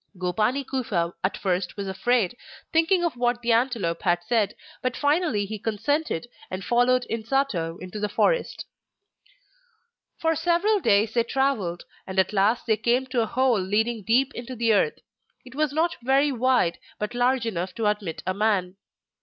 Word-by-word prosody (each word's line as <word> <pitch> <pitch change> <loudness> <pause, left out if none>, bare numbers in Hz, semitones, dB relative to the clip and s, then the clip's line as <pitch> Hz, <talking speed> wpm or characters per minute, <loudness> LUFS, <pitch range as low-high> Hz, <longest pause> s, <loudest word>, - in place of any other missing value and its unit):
Gopani 210 +9 0
Kufa 200 -11 -1
at 185 - 0
first 180 -1 -2
was 200 -1 -4
afraid, 215 +2 +1 0.4
thinking 330 +3 +3
of 335 - -1
what 240 0 0
the 235 - +1
antelope 230 -8 +1
had 175 -2 +1
said, 215 0 +1 0.3
but 255 0 -2
finally 290 - +1
he 215 +1 -6
consented 230 - -1 0.2
and 185 0 -5
followed 250 +1 +3
Insato 220 -8 -1
into 185 +3 -7
the 210 0 -1
forest. - - 0 1.5
For 325 0 +1
several 350 +6 +2
days 215 - +2
they 235 - +3
travelled, 230 -9 -1 0.2
and 190 0 -6
at 190 +2 +2
last 210 +4 +2
they 220 -2 +2
came 240 +4 +1
to 245 -3 +2
a 225 - 0
hole 250 -1 +2
leading 220 +4 0
deep 250 +7 +2
into 245 +2 -7
the 230 -1 +2
earth. 455 - +2 0.5
It 255 - -12
was 300 +1 0
not 325 +4 +1
very 270 +4 +3
wide, 250 -8 +1 0.2
but 210 +2 -4
large 245 0 +1
enough 185 -4 -3
to 225 - -2
admit 210 -6 -1
a 185 - 0
man. 195 -3 0
230 Hz, 165 wpm, -25 LUFS, 195-260 Hz, 1.5 s, thinking